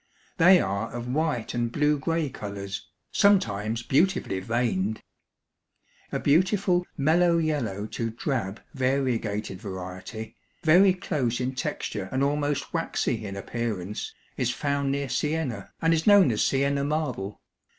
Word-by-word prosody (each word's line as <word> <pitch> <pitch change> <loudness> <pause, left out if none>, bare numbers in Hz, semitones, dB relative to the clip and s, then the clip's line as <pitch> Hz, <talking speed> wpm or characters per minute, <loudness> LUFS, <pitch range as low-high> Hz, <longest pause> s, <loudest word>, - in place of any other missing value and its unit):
They 180 +1 +7
are 100 - -2
of 120 0 -5
white 150 -6 -1
and 120 -1 -1
blue 150 +2 +2
gray 165 +1 0
colors, 100 -2 -6 0.2
sometimes 115 - +2
beautifully 140 - +1
veined. 110 -1 -1 1.1
A - - -1
beautiful, 180 +3 +2
mellow 170 +4 +4
yellow 130 -11 -1
to 115 +1 -3
drab 115 -4 -3
variegated 125 -7 -1
variety, 95 +3 -7 0.3
very 180 +4 +6
close 130 -10 -1
in 130 +1 -1
texture 105 -6 -3
and 130 +1 +1
almost 145 0 -1
waxy 125 -8 -1
in 100 - -6
appearance, 105 -1 -4 0.3
is - - +1
found 140 -1 0
near 140 0 -1
Siena, 145 -8 -2
and 165 0 +4
is 160 +2 0
known 200 -9 +7
as 105 - +1
Siena 140 +1 +1
marble. 140 -9 -2
130 Hz, 130 wpm, -26 LUFS, 110-155 Hz, 1.1 s, They